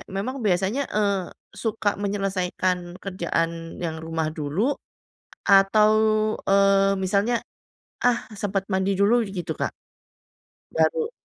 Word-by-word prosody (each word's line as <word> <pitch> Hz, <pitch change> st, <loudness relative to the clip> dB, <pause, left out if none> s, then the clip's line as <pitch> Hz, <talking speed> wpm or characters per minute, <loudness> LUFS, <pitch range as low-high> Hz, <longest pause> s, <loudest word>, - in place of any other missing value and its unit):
memang 230 Hz, +8 st, -4 dB
biasanya, 205 Hz, +6 st, 0 dB
eee, 200 Hz, -3 st, 0 dB, 0.2 s
suka 215 Hz, -3 st, -2 dB
menyelesaikan 185 Hz, -3 st, -1 dB
kerjaan 165 Hz, -3 st, -3 dB
yang 160 Hz, -1 st, -3 dB
rumah 160 Hz, -1 st, -2 dB
dulu 160 Hz, -, 0 dB, 0.8 s
atau, 200 Hz, +2 st, +6 dB, 0.5 s
eee, 195 Hz, 0 st, +4 dB
misalnya, 200 Hz, +5 st, +1 dB, 0.6 s
ah, 245 Hz, -1 st, +2 dB
sempat 200 Hz, -2 st, -2 dB
mandi 190 Hz, 0 st, +1 dB
dulu 220 Hz, +5 st, +4 dB
gitu 185 Hz, -3 st, -4 dB
Kak? -, -, -1 dB, 1.0 s
Baru. 475 Hz, -2 st, +1 dB
195 Hz, 100 wpm, -24 LUFS, 180-210 Hz, 1.0 s, atau